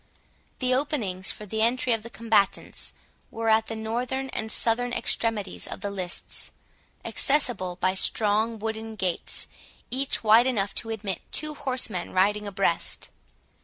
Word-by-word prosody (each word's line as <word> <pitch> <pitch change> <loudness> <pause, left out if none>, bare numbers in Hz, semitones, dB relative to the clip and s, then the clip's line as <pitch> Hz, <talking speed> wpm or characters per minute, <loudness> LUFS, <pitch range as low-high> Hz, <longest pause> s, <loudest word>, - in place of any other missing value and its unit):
The 255 -1 +2
openings 235 -10 0
for 210 - -6
the 220 +2 -2
entry 240 +2 +3
of 225 - 0
the 235 - -9
combatants 220 -4 0 0.4
were 225 0 -1
at 220 0 +4
the 225 - -4
northern 245 +4 -2
and 220 -3 -4
southern 240 +2 +1
extremities 225 -5 0
of - - -7
the 200 0 -3
lists, 185 -3 -3 0.6
accessible 245 -11 +2
by 185 +1 +1
strong 215 +3 +1
wooden 220 +1 -4
gates, 185 -4 -1 0.5
each 265 0 0
wide 225 +3 +7
enough 205 -6 0
to 225 - -10
admit 205 -5 -3
two 305 0 +1
horsemen 255 -10 -1
riding 205 +3 +2
abreast. 195 -4 0
220 Hz, 140 wpm, -27 LUFS, 200-240 Hz, 0.6 s, wide